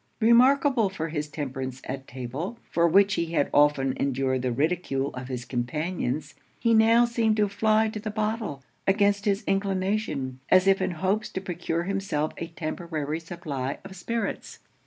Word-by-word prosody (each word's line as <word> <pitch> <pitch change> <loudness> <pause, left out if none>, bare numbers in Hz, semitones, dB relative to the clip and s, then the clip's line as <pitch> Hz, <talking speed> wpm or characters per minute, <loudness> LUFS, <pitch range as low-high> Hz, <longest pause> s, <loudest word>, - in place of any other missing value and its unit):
Remarkable 245 0 +5
for 165 -4 -4
his 150 -1 -3
temperance 130 -3 -5
at 135 0 -6
table, 135 - -5
for 170 0 +3
which 195 +3 +5
he 170 -2 -2
had 145 - +1
often 145 -3 +4
endured 130 -1 0
the 125 -1 -1
ridicule 140 0 -1
of 125 0 -6
his 125 -2 -5
companions, 145 +3 -2 0.3
he 230 -1 +3
now 225 +2 +6
seemed 225 -2 +1
to 210 -1 +3
fly 215 +2 +2
to 215 0 -5
the 215 +1 -4
bottle, 215 - -2 0.2
against 200 0 +3
his 200 -1 +1
inclination, 195 - -1
as 185 0 +6
if 195 0 +4
in 185 - +1
hopes 190 +5 -1
to - - -4
procure 175 -2 -3
himself 195 -5 -1
a 165 - -4
temporary 160 -2 -4
supply 155 -6 -4
of 190 - -9
spirits. 225 +4 -4
175 Hz, 160 wpm, -26 LUFS, 140-205 Hz, 0.3 s, now